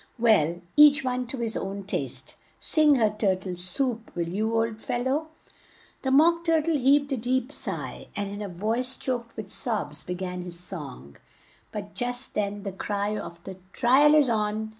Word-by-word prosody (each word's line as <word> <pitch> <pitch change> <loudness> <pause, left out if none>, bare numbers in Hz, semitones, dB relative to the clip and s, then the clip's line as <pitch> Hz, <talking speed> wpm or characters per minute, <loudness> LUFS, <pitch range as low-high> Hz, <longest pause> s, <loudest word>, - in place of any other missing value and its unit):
Well, 180 -8 +3
each 295 -1 +7
one 250 -1 -1
to 265 - -4
his 230 -3 -2
own 195 +1 -4
taste. 195 - -4 0.2
Sing 305 -2 +4
her 220 -5 +3
'Tur 205 -3 +1
tle 185 -1 -6
Soup,' 225 +6 -1
will 170 -1 -1
you, 215 +6 -1
old 225 -1 0
fel 240 - -2
low?" 285 +5 0 0.7
The 265 - -1
Mock 335 +5 +5
Tur 330 -1 +3
tle 330 0 +1
heaved 280 +1 +3
a - - 0
deep 250 +2 -1
sigh, - - -5
and 205 -1 -2
in 205 +1 -6
a 205 - -4
voice 225 +8 0
choked 240 -3 -4
with 210 -2 -6
sobs, 210 - -2
be 180 - -4
gan 180 0 -4
his 175 -1 -7
song, 140 - -8 0.5
but 205 -1 -6
just 245 +1 -4
then 205 -1 -2
the 195 - -3
cry 205 +2 -2
of 170 -4 -7
"The 190 -1 -8 0.2
tri 260 +3 +4
al 295 +1 +7
is 295 -3 +5
on!" 215 -1 -1
220 Hz, 190 wpm, -26 LUFS, 195-260 Hz, 0.7 s, each